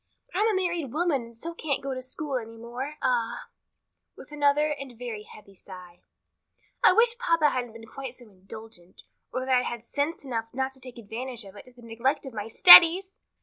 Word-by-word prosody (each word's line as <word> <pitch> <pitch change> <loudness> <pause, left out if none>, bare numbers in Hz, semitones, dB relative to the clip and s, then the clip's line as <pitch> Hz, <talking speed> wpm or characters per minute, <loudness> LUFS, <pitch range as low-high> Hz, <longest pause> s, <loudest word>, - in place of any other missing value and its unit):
"But 365 - -2
I'm 430 - +3
a 435 - +1
married 345 -7 -2
woman 315 -4 0
and 230 -1 -13
so 335 +8 -7
can't 300 -5 -3
go 275 -1 -3
to 255 - -6
school 270 +2 -4
any 225 -1 -8
more. 245 +6 -7
Ah," - - -1 0.7
with - - -14
another 295 +1 +2
and 275 -5 -7
very 235 -3 -6
heavy 210 -1 -16
sigh, 180 -2 -13 0.8
"I - - +8
wish 470 +1 +3
papa 330 - +2
hadn't 245 -3 -4
been 230 0 -12
quite 260 +2 -8
so 245 - -15
indulgent, 195 -2 -14 0.3
or 255 0 -3
that 260 -1 +2
I'd 250 0 +1
had 235 -2 -5
sense 285 +5 -3
enough 230 -4 -3
not 265 +1 -2
to 265 - -16
take 255 -1 -10
advantage 235 +2 -7
of 195 - -14
it 200 - -12
to 255 - -18
the 245 -1 -18
neglect 235 +6 -2
of 265 - -8
my 210 -1 -5
studies!" 355 - +8
255 Hz, 205 wpm, -26 LUFS, 230-300 Hz, 0.8 s, I